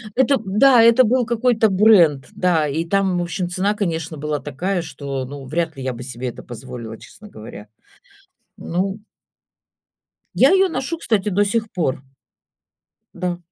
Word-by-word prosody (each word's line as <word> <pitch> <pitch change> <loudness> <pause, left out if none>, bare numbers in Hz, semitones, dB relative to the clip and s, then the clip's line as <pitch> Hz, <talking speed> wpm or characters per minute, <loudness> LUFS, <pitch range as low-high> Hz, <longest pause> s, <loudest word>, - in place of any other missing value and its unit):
это 265 +1 +3
да, 230 +5 +5
это 235 +2 +6
был 245 +2 +2
какой-то 230 -1 +2
бренд, 185 - +4
да, 165 -4 +1
и 155 +4 -2
там, 190 0 +1
в - - 0
общем, 175 +1 -3
цена, 190 +3 0
конечно, 165 -6 -3
была 150 0 -3
такая, 175 +6 -3
что, 140 -3 -5
ну, 140 +1 -9
вряд 160 +2 -3
ли 135 - -6
я 130 -1 -2
бы 120 +1 -8
себе 125 0 -6
это - - -11
позволила, 120 -2 -9
честно 210 - -15
говоря, 105 - -11 0.9
ну. 190 +4 -3 1.4
Я - - +5
её 385 0 +4
ношу, 325 +1 -3
кстати, 215 -10 0
до 205 +2 +2
сих 220 +1 -1
пор. 140 -7 -2 1.1
Да. 175 -1 -3
180 Hz, 155 wpm, -20 LUFS, 145-215 Hz, 1.4 s, это